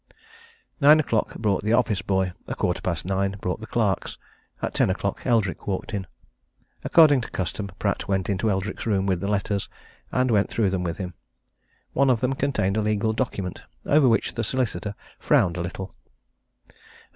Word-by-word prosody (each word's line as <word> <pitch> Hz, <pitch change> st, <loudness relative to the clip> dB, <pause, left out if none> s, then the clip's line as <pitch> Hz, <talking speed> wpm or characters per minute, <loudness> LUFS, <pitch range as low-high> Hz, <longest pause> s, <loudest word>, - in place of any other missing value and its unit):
Nine 150 Hz, +1 st, +7 dB
o'clock 115 Hz, -8 st, 0 dB
brought 105 Hz, -4 st, 0 dB
the 110 Hz, +2 st, 0 dB
office 115 Hz, -4 st, +2 dB
boy; 95 Hz, -2 st, 0 dB
a -, -, -3 dB
quarter -, -, -1 dB
past 85 Hz, -3 st, -2 dB
nine 95 Hz, +1 st, 0 dB
brought 90 Hz, +1 st, -2 dB
the 110 Hz, -, -7 dB
clerks; 105 Hz, -6 st, -1 dB, 0.4 s
at -, -, -3 dB
ten -, -, +2 dB
o'clock 100 Hz, +1 st, -2 dB
Eldrick 110 Hz, -6 st, +1 dB
walked 95 Hz, +2 st, -3 dB
in. 95 Hz, -2 st, -3 dB, 0.8 s
According 150 Hz, -5 st, +6 dB
to -, -, -7 dB
custom, 100 Hz, +2 st, -3 dB
Pratt -, -, -1 dB
went 95 Hz, -1 st, 0 dB
into 100 Hz, +2 st, 0 dB
Eldrick's 95 Hz, +2 st, -2 dB
room 100 Hz, -3 st, +1 dB
with 95 Hz, -3 st, +1 dB
the 100 Hz, -, -3 dB
letters, 100 Hz, -1 st, -1 dB, 0.4 s
and 130 Hz, -1 st, +1 dB
went 105 Hz, -2 st, +3 dB
through 105 Hz, -5 st, +1 dB
them 95 Hz, -1 st, -1 dB
with 85 Hz, -2 st, -3 dB
him. 90 Hz, -2 st, -5 dB, 0.8 s
One 140 Hz, 0 st, +3 dB
of 125 Hz, -3 st, +3 dB
them 125 Hz, +2 st, 0 dB
contained 130 Hz, -8 st, 0 dB
a -, -, +2 dB
legal 105 Hz, +1 st, +1 dB
document 105 Hz, -7 st, -3 dB, 0.2 s
over 145 Hz, -3 st, +5 dB
which 115 Hz, -, +1 dB
the 115 Hz, -, -2 dB
solicitor 105 Hz, -5 st, -2 dB, 0.2 s
frowned 85 Hz, -3 st, +3 dB
a 85 Hz, -, -3 dB
little. 95 Hz, +2 st, -5 dB
100 Hz, 175 wpm, -25 LUFS, 95-115 Hz, 0.8 s, Nine